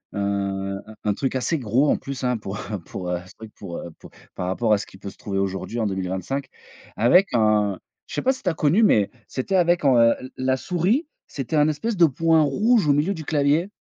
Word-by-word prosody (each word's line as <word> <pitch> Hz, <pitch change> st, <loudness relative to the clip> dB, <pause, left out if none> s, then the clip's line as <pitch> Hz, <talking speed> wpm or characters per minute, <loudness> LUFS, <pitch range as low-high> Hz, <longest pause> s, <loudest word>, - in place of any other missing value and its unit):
heu, -, -, -4 dB
un 100 Hz, -1 st, -2 dB, 0.2 s
un 105 Hz, -1 st, +1 dB
truc 130 Hz, +4 st, -2 dB
assez 145 Hz, +5 st, 0 dB
gros 125 Hz, +5 st, +2 dB
en -, -, +3 dB
plus 135 Hz, -1 st, -7 dB
hein, 125 Hz, -2 st, +1 dB
pour, 105 Hz, -1 st, -6 dB
heu 105 Hz, -3 st, -5 dB
pour 90 Hz, -2 st, -6 dB
heu, -, -, +1 dB
un 90 Hz, -, -10 dB
truc 110 Hz, -1 st, -11 dB
pour, 90 Hz, -4 st, -8 dB
heu 85 Hz, -, -7 dB
pour -, -, -13 dB, 0.2 s
par 90 Hz, -, -4 dB
rapport 110 Hz, +4 st, +1 dB
à -, -, +4 dB
ce -, -, -7 dB
qui -, -, -15 dB
peut 100 Hz, +1 st, -7 dB
se -, -, -21 dB
trouver 100 Hz, -2 st, -4 dB
aujourd'hui 95 Hz, +4 st, -2 dB
en 110 Hz, -, 0 dB
2025. 95 Hz, +8 st, -3 dB, 0.5 s
Avec 175 Hz, -, +5 dB
un 105 Hz, -3 st, +2 dB, 0.3 s
je -, -, -8 dB
sais -, -, -1 dB
pas 260 Hz, -, +4 dB
si 260 Hz, -, -12 dB
tu 185 Hz, -, 0 dB
as -, -, 0 dB
connu 160 Hz, +8 st, +3 dB
mais, 105 Hz, -, +4 dB, 0.2 s
c'était 135 Hz, +9 st, -2 dB
avec, 175 Hz, -2 st, +3 dB
heu, 120 Hz, -3 st, +5 dB
l 130 Hz, -, -9 dB
la 130 Hz, 0 st, +1 dB
souris, 185 Hz, -, 0 dB, 0.2 s
c'était 140 Hz, +2 st, -3 dB
un 150 Hz, 0 st, +5 dB
espèce 180 Hz, +10 st, -1 dB
de 175 Hz, -, +7 dB
point 160 Hz, +3 st, +3 dB
rouge 205 Hz, -, +2 dB
au 145 Hz, -, +5 dB
milieu 150 Hz, +7 st, +1 dB
du 160 Hz, -4 st, -7 dB
clavier. 150 Hz, +5 st, +1 dB
130 Hz, 240 wpm, -23 LUFS, 100-160 Hz, 0.5 s, de